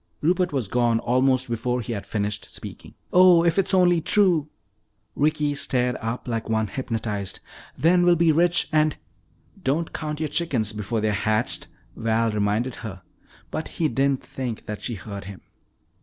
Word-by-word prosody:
Rupert 180 Hz, +2 st, +2 dB
was 130 Hz, -7 st, -1 dB
gone 120 Hz, +1 st, +2 dB
almost 130 Hz, +2 st, +2 dB
before 120 Hz, +1 st, -1 dB
he 115 Hz, +1 st, -4 dB
had 100 Hz, -, -6 dB
finished 105 Hz, -1 st, -2 dB
speaking. -, -, -10 dB, 0.2 s
"Oh, 180 Hz, -2 st, +7 dB
if 170 Hz, +3 st, +3 dB
it's 195 Hz, -, +2 dB
only 180 Hz, -3 st, +4 dB
true!" 170 Hz, -4 st, +3 dB, 0.7 s
Ricky 150 Hz, 0 st, +1 dB
stared 125 Hz, -3 st, 0 dB
up 115 Hz, +3 st, -4 dB
like 115 Hz, -2 st, -3 dB
one 110 Hz, -1 st, 0 dB
hypnotized. 115 Hz, -6 st, -3 dB, 0.4 s
"Then 170 Hz, +6 st, +4 dB
we'll 175 Hz, 0 st, +5 dB
be 170 Hz, -1 st, +4 dB
rich 170 Hz, +2 st, +3 dB
and 155 Hz, -1 st, +2 dB, 0.3 s
" -, -, -28 dB
"Don't 155 Hz, +5 st, 0 dB
count 150 Hz, -1 st, -4 dB
your 155 Hz, -1 st, -1 dB
chickens 125 Hz, -11 st, -1 dB
before 105 Hz, +1 st, -2 dB
they're 110 Hz, 0 st, +1 dB
hatched," 110 Hz, +1 st, 0 dB, 0.3 s
Val 115 Hz, 0 st, +1 dB
reminded 105 Hz, +4 st, 0 dB
her, 95 Hz, -5 st, -8 dB, 0.5 s
but 155 Hz, -, -3 dB
he 165 Hz, -, +2 dB
didn't 135 Hz, -1 st, 0 dB
think 125 Hz, -4 st, -5 dB
that 105 Hz, -1 st, -6 dB
she 120 Hz, -, -3 dB
heard 100 Hz, +1 st, -8 dB
him. 100 Hz, -1 st, -9 dB
125 Hz, 165 wpm, -24 LUFS, 110-160 Hz, 0.7 s, Oh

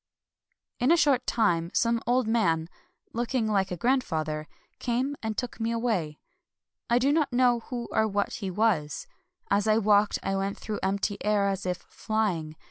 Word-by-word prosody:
^ -, -, -3 dB
In 260 Hz, -, +4 dB
a 340 Hz, -, +6 dB
short 270 Hz, -6 st, +3 dB
time 170 Hz, -7 st, +1 dB
some 230 Hz, 0 st, +2 dB
old 245 Hz, -1 st, +2 dB
man, 170 Hz, -8 st, +1 dB, 0.2 s
— -, -, -43 dB
looking 240 Hz, 0 st, 0 dB
like 195 Hz, -3 st, +1 dB
a 180 Hz, -, -4 dB
grandfather 160 Hz, -, 0 dB, 0.2 s
— -, -, -41 dB
came 255 Hz, +4 st, 0 dB
and 220 Hz, -1 st, -3 dB
took 245 Hz, -1 st, -4 dB
me 225 Hz, 0 st, 0 dB
away. 215 Hz, -11 st, -1 dB, 0.7 s
I 235 Hz, -, +4 dB
do 265 Hz, +3 st, +3 dB
not 300 Hz, -2 st, +2 dB
know 245 Hz, -1 st, +3 dB
who 240 Hz, -2 st, -4 dB
or 220 Hz, -, +2 dB
what 205 Hz, -1 st, -1 dB
he 195 Hz, -, -4 dB
was. 185 Hz, -7 st, 0 dB, 0.5 s
As 200 Hz, +2 st, +2 dB
I 215 Hz, 0 st, +4 dB
walked 205 Hz, -1 st, +3 dB
I 195 Hz, -, -1 dB
went 195 Hz, +1 st, -2 dB
through 215 Hz, -1 st, -4 dB
empty 200 Hz, +1 st, -1 dB
air 205 Hz, -1 st, +2 dB
as 195 Hz, -1 st, -3 dB
if 180 Hz, -1 st, -1 dB
flying. 185 Hz, -8 st, -2 dB
215 Hz, 185 wpm, -27 LUFS, 190-240 Hz, 0.7 s, a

